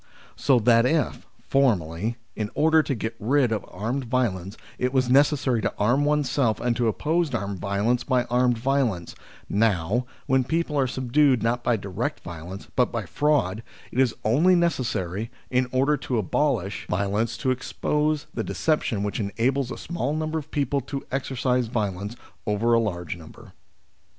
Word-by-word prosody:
So 135 -3 +3
that 115 +1 +4
if, 155 0 0 0.2
formerly, 110 - +1 0.2
in 105 -1 -2
order 160 +1 +5
to 140 -3 -2
get 110 0 -4
rid 125 +2 +2
of 110 - -1
armed 120 +8 -3
violence, 110 -6 -1 0.2
it 125 +1 0
was 130 -2 +2
necessary 135 -3 +3
to - - 0
arm 120 +8 +2
oneself 145 -5 +1
and 120 -1 0
to 120 -2 +1
oppose 160 +7 0
armed 100 -4 -3
violence 105 +6 0
by 125 -1 +2
armed 125 0 +2
violence, 120 -8 0 0.3
now, 105 +2 +1 0.2
when 130 0 +3
people 160 +2 -1
are 135 -2 +2
subdued 130 0 +2
not 120 +1 0
by 120 - +2
direct 100 +9 -3
violence 85 +3 -8
but 125 -2 +2
by 115 -4 -3
fraud, 120 - +1 0.3
it 125 - -2
is 130 -4 +3
only 155 +12 +4
necessary, 115 - -1 0.2
in 125 0 +2
order 135 +3 +2
to 125 - -2
abolish 110 -2 0
violence, 100 +4 0
to 130 +3 0
expose 150 +3 -1
the - - -2
deception 135 -10 0
which 105 - -2
enables 120 +6 0
a - - -5
small 150 -4 -3
number 155 0 -1
of 155 0 -11
people 140 -1 0
to 135 +2 -6
exercise 125 -2 0
violence 105 -1 -2 0.3
over 110 +3 +2
a 115 - +5
larger 90 -6 -3
number. 80 - -14
120 Hz, 160 wpm, -25 LUFS, 105-140 Hz, 0.3 s, order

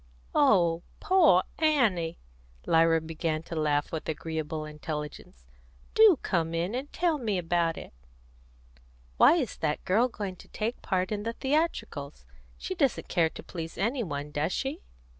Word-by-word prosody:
"Oh, 175 - +4 0.2
poor 325 - +5 0.2
Annie!" 220 - +2 0.5
Lyra 165 0 +4
began 160 0 -3
to 165 - -7
laugh 150 -2 0
with 160 -1 -4
agreeable 160 0 -3
intelligence. 150 - -7 0.5
"Do 435 -7 +7
come 165 -3 0
in 175 +5 -1
and 265 +4 -4
tell 335 -3 0
me 215 -6 -1
about 170 -1 0
it!" - - -9 1.2
"Why - - +7
is 275 - -2
that 150 -1 -2
girl 215 +7 +3
going 200 -6 -6
to - - -15
take 225 +3 -3
part 185 0 -1
in 210 -1 -2
the 230 +2 -3
theatricals? 300 +7 -2 0.3
She 375 - -4
doesn't 285 -8 0
care 165 -3 +2
to - - -10
please 165 -2 -7
any 235 +7 0
one, 145 -6 -4
does 150 +4 -1
she?" 275 +3 -3
175 Hz, 150 wpm, -28 LUFS, 160-250 Hz, 1.2 s, Do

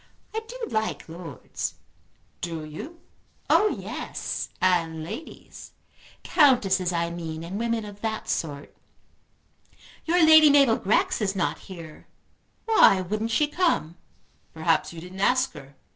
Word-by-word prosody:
I 445 - -1
do - - -8
like 220 0 -2
lords." 165 -4 -6 0.7
"Do 165 -2 -4
you?" 295 - -9 0.5
"Oh 425 - +5
yes, - - -5
and 165 -4 +1
ladies; 300 - -9 0.5
Countesses 200 - +3
I 170 -1 -1
mean 165 -2 -6
and 185 +5 -5
women 230 -1 -1
of 205 0 -11
that 220 -1 -3
sort. 145 -3 -4 1.3
Your 340 0 +4
Lady 315 -1 +8
Mabel 275 -5 +5
Grex 205 +3 +1
is 200 -1 0
not 185 - -1
here. 165 -4 -10 0.6
Why 435 - +5
wouldn't 215 +5 -2
she 265 +7 +2
come?" 295 - 0 0.6
"Perhaps 160 +1 +1
you 170 - -9
didn't 180 +2 -10
ask 255 +4 +2
her." 135 +1 -13
190 Hz, 130 wpm, -25 LUFS, 165-255 Hz, 1.3 s, Lady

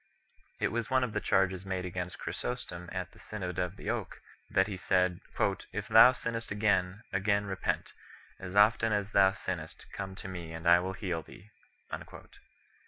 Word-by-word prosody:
It - - +1
was 115 0 -2
one 130 -1 +3
of 115 -4 -2
the - - +1
charges 95 -1 +2
made 95 -1 -3
against 90 0 -4
Chrysostom 90 -8 -5
at 90 -1 -4
the - - -19
Synod 95 -4 -5
of 90 +1 -1
the - - -3
Oak - - -4 0.3
1, - - -16
that 95 - +6
he 105 - -5
had 95 - -6
said, 90 -2 +2 0.5
"if - - -4
thou 125 - +9
sinnest 115 -2 -4
again, 100 -1 +1
again 100 +1 +2
repent; 95 -1 -2 0.5
as 95 0 -7
often 110 +2 +5
as 105 0 -1
thou 95 -1 +6
sinnest, 90 -5 -5
come 95 -1 -5
to - - -8
me 85 -3 -6
and 80 +1 -5
I 85 0 +8
will 95 +1 -3
heal 90 -4 -3
thee." 100 +6 -15
95 Hz, 180 wpm, -31 LUFS, 90-105 Hz, 0.5 s, thou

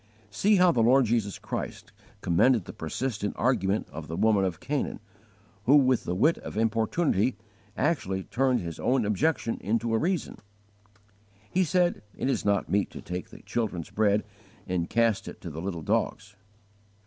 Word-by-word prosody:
See 205 - +3
how 180 -2 +5
the 120 - +1
Lord 125 +3 +5
Jesus 110 -3 0
Christ - - -6 0.3
commended 100 +4 +3
the - - -8
persistent 105 +5 -3
argument 110 -5 +1
of 75 +1 -7
the 80 - -5
woman 110 -3 +3
of 90 -4 -3
Canaan, 145 0 -2 0.7
who 135 - +6
with 130 -4 +4
the 90 - -2
wit 155 - +3
of - - -8
importunity 115 - +1 0.4
actually 95 - 0
turned 130 +3 +1
his 85 -2 -6
own 125 -3 +1
objection 115 +3 0
into 115 +2 0
a 110 - +3
reason. 180 +3 -1 1.1
He 185 - +3
said, 175 +1 +1 0.2
"It 135 - 0
is - - -1
not 100 -1 +1
meet 100 0 +1
to - - -8
take 90 0 -5
the - - -13
children's 105 -8 -3
bread 105 -1 +2 0.4
and 90 -2 -2
cast 115 -3 +1
it - - -8
to 85 - -6
the 80 +2 -6
little 85 -3 -4
dogs." 110 0 -1
110 Hz, 165 wpm, -27 LUFS, 95-130 Hz, 1.1 s, who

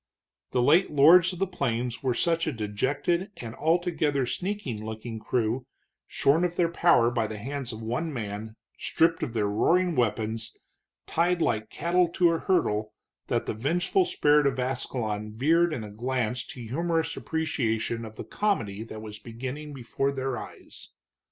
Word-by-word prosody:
The 125 - +1
late 165 +9 +5
lords 165 +5 +7
of 180 - -7
the 195 - +1
plains 125 -8 -2
were 130 -3 0
such 165 +4 +1
a - - +1
dejected 135 - -1
and 115 -2 -7
altogether 160 -3 +1
sneaking 155 - -3
looking 110 +1 -6
crew, 120 +3 -1 0.4
shorn 150 +5 +2
of 175 -1 0
their 170 -2 +2
power 165 -9 +4
by 115 -2 0
the 110 0 -6
hands 135 +3 -4
of 110 0 -7
one 125 +9 -2
man, 110 -3 -5 0.2
stripped 165 0 +2
of 130 -7 -3
their 110 -3 +1
roaring 170 - +2
weapons, 110 -2 -1 0.5
tied 175 +2 +1
like 110 -8 0
cattle 175 +1 +2
to 170 0 +3
a 165 - 0
hurdle, 110 - 0 0.3
that - - 0
the - - -2
vengeful 175 - +1
spirit 150 - +3
of 135 -1 0
Ascalon 115 -4 -2
veered 165 +8 +3
in 125 -7 -3
a 105 - -8
glance 125 +1 -2
to 135 -8 -9
humorous 165 +8 -1
appreciation 115 -8 -1
of 110 -1 -9
the - - -6
comedy 115 - -1
that 110 -1 -8
was 105 -1 -8
beginning 130 +6 -6
before 135 +1 -2
their 135 -1 -2
eyes. - - -10
130 Hz, 165 wpm, -27 LUFS, 110-165 Hz, 0.5 s, lords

